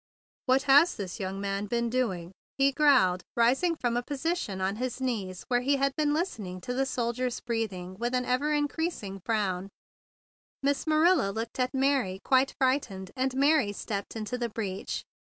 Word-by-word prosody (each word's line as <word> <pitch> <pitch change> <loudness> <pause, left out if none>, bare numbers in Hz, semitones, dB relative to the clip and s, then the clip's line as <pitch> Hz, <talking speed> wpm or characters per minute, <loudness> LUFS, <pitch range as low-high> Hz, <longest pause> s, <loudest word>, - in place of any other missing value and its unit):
"What 260 +2 +4
has 290 +5 +6
this 190 -3 -6
young 190 0 -3
man 200 +1 -2
been 235 +2 0
do¬ 235 -5 0
ing?" 170 +1 -10 0.3
he 275 0 +4
growled, 260 -12 +4 0.2
rising 265 +9 +3
from 240 -6 -1
a 240 - +1
position 285 - -2
on 190 +2 -1
his 255 +1 -3
knees 205 -8 -3
where 245 -1 +2
he 280 +3 +2
had 275 0 +1
been 300 -1 +1
listen¬ 310 - -1
ing 180 0 -6
to 245 - -4
the 270 +1 0
soldier's 245 -1 -1
breathing 200 -6 -3
with 240 +2 -1
an 250 0 0
ever 255 +4 +1
increasing 295 - -2
frown. 195 -4 -1 0.9
Miss 285 +3 0
Marilla 315 - +4
looked 225 +5 -5
at 255 +2 0
Mary 265 -9 +1
quite 265 0 +3
frightened, 255 -8 0
and 260 0 -1
Mary 280 -5 +3
stepped 200 +1 -5
into 225 +3 -4
the 240 -1 -1
breach. 200 -3 -4
245 Hz, 175 wpm, -28 LUFS, 200-275 Hz, 0.9 s, has